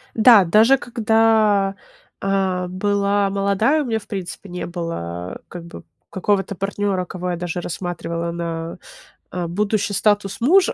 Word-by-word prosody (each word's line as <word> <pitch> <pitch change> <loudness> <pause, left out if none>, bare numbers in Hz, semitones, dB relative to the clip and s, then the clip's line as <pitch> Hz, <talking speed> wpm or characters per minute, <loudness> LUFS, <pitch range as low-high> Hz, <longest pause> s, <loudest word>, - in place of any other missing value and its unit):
Да, 220 -3 +7
даже 225 +9 +5
когда, 220 -4 +2 0.5
а, 190 -2 0
была 200 +1 +1
молодая, 200 +9 +2
у - - -3
меня, 225 -2 -1
в - - -18
принципе, 190 0 -6
не 180 0 -5
было, 90 - -5
как 175 -1 -9
бы, 170 - -11 0.3
какого-то 195 0 0
партнера, 195 -1 -1
кого 180 0 -4
я 175 - -2
даже 175 0 -3
рассматривала 170 -1 -4
на, 165 -1 -4 0.5
а, 175 -2 -3
будущий 205 +3 0
статус 205 0 +1
мужа, 360 +8 +4
195 Hz, 140 wpm, -21 LUFS, 175-210 Hz, 0.5 s, Да